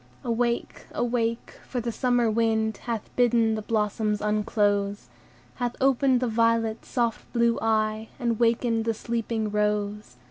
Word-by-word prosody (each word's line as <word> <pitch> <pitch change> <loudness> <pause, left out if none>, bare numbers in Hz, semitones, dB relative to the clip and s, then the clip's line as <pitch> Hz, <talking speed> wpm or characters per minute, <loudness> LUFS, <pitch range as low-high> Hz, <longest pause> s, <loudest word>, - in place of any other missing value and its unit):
"Awake! 235 0 -1
awake! 230 -1 -1
for 250 - -3
the 235 0 -2
summer 245 0 +1
wind 220 -1 +1
Hath 230 -3 -4
bidden 235 -2 +3
the 215 - -2
blossoms 210 -1 0
unclose, 205 - 0 0.5
Hath 245 0 -2
opened 265 -1 +3
the 250 - +1
violet's 230 0 +1
soft 235 -3 -1
blue 235 -1 +2
eye, 220 0 0
And 235 -4 -1
wakened 230 -1 +2
the 225 -1 0
sleeping 230 -2 -2
rose. 210 - -1
225 Hz, 135 wpm, -26 LUFS, 215-235 Hz, 0.5 s, bidden